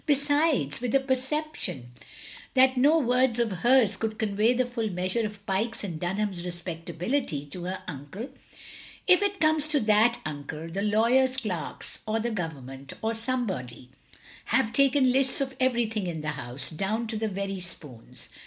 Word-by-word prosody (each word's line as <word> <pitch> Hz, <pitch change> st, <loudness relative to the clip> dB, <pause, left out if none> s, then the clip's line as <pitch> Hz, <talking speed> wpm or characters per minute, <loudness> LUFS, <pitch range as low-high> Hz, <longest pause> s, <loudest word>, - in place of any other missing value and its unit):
"Besides," 285 Hz, -, +2 dB
with 250 Hz, 0 st, 0 dB
a -, -, +7 dB
perception 265 Hz, -, -3 dB, 0.6 s
that 260 Hz, 0 st, +6 dB
no 285 Hz, +6 st, +5 dB
words 250 Hz, -3 st, +2 dB
of 235 Hz, -2 st, +1 dB
hers 225 Hz, +3 st, +3 dB
could 220 Hz, -1 st, -2 dB
convey 215 Hz, +1 st, +2 dB
the 250 Hz, 0 st, +2 dB
full 235 Hz, -3 st, -2 dB
measure 185 Hz, +5 st, -1 dB
of 210 Hz, -1 st, -6 dB
Pyke's 215 Hz, +4 st, -1 dB
and 170 Hz, -6 st, -4 dB
Dunham's 185 Hz, 0 st, -2 dB
respectability 175 Hz, -, -3 dB
to 175 Hz, +5 st, -7 dB
her 185 Hz, +1 st, -4 dB
uncle, 165 Hz, -, -7 dB, 0.4 s
" -, -, -14 dB, 0.3 s
if 365 Hz, 0 st, +6 dB
it 405 Hz, -1 st, 0 dB
comes 310 Hz, -1 st, +3 dB
to 305 Hz, -1 st, +2 dB
that, 220 Hz, +2 st, +4 dB
Uncle, 155 Hz, +2 st, -6 dB
the 195 Hz, +3 st, -2 dB
lawyer's 235 Hz, +5 st, +3 dB
clerks, 185 Hz, -, -3 dB
or 220 Hz, +1 st, +1 dB
the 235 Hz, +2 st, -1 dB
Government, 140 Hz, -, -5 dB
or 225 Hz, +1 st, +1 dB
somebody 205 Hz, -, -3 dB, 0.3 s
— -, -, -20 dB
^have 230 Hz, -4 st, +2 dB
taken 275 Hz, -2 st, +4 dB
lists 265 Hz, +1 st, +2 dB
of 270 Hz, -1 st, -2 dB
everything 235 Hz, -6 st, +1 dB
in 165 Hz, -3 st, -3 dB
the 155 Hz, -, -2 dB
house, 135 Hz, -1 st, -4 dB
down 205 Hz, +8 st, -1 dB
to 225 Hz, 0 st, -4 dB
the 220 Hz, +1 st, -1 dB
very 195 Hz, -1 st, -3 dB
spoons. 150 Hz, -9 st, -8 dB
220 Hz, 165 wpm, -27 LUFS, 175-255 Hz, 0.6 s, a